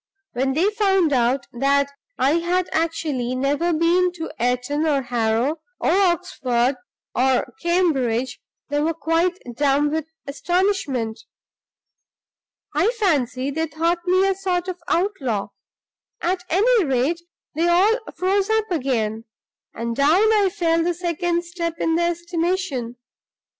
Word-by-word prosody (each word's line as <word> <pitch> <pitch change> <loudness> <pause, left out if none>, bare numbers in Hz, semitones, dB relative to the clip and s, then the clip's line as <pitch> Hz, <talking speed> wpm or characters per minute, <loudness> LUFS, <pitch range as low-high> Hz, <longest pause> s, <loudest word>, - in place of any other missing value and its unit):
When 265 +2 0
they 355 +9 +2
found 385 -7 +2
out 250 +1 +1
that 280 +3 +1 0.3
I 285 +6 +3
had 355 +2 0
actually 305 -6 -1
never 285 +6 0
been 340 +3 +2
to 325 -2 -6
Eton 250 +6 0
or 280 -3 +1
Harrow, 240 +4 0 0.2
or - - +1
Oxford 290 -10 +1 0.4
or 260 0 +1
Cambridge, 270 -9 0 0.3
they 290 0 0
were 325 +2 0
quite 330 +3 +1 0.2
dumb 285 +2 +2
with 315 -1 -1 0.2
astonishment. 295 - -1 1.5
I - - +2
fancy 275 - +1
they 320 +3 -1
thought 330 +3 0
me 370 +2 +4
a 390 - +2
sort 370 -2 -2
of 365 -1 -4
outlaw. 275 - -1 0.7
At 360 +1 -1
any 435 +5 +3
rate, 275 +4 0 0.3
they 330 +3 +1
all 390 +7 +4 0.2
froze 390 +2 +1
up 440 -2 +1
again; 230 -8 -1 0.5
and 230 +1 -3
down 345 - +4
I 410 -3 +3
fell 330 -2 +1
the 350 0 0
second 345 0 -1
step 340 -1 -4
in 325 - 0
their 340 +1 +2
estimation. 345 -7 -2
330 Hz, 130 wpm, -22 LUFS, 265-360 Hz, 1.5 s, me